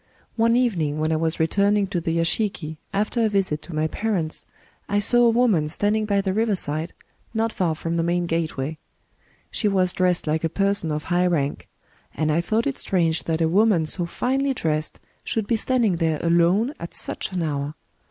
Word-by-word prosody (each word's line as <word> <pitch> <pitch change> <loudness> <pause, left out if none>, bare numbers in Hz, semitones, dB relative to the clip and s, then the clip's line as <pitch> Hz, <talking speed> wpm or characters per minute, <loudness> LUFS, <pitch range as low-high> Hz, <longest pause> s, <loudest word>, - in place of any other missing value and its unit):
One 230 0 +3
even 240 -8 +2
ing, 150 -1 -1
when 155 +1 0
I - - +2
was 160 +1 -1
returning 200 +5 +2
to 175 -3 -1
the 165 0 -1
yashiki 165 -2 -1
after 210 +3 0
a 220 - +3
visit 190 -7 0
to 170 - -9
my 155 0 +1
parents, 175 -2 -2 0.4
I 205 - +1
saw 240 +4 +4
a - - +6
woman 225 -10 +3
standing 210 +6 +1
by 200 -1 +2
the 190 -1 -1
riverside, 180 -7 -1 0.4
not 225 0 0
far 170 -4 0
from 165 +2 -3
the - - +2
main 175 +1 0
gateway. 160 -3 -2 0.7
She 215 - 0
was 185 -3 +2
dressed 180 -1 +1
like 155 +1 0
a 165 - +1
person 195 -2 0
of 150 0 -2
high 180 +1 +1
rank; 145 -5 -1 0.5
and 155 -1 0
I 165 +3 +2
thought 220 +6 0
it 280 -2 -2
strange 165 -4 0
that 165 0 -1
a 165 - +3
woman 190 -1 +3
so 170 +2 -1
finely 270 +7 0
dressed 155 -6 -2 0.2
should 220 -2 -1
be 230 - +1
standing 225 -5 +1
there 160 -2 0
alone 175 - +3
at 170 - -7
such - - -3
an 180 -2 -1
hour. 145 -1 -3
175 Hz, 195 wpm, -23 LUFS, 160-210 Hz, 0.7 s, a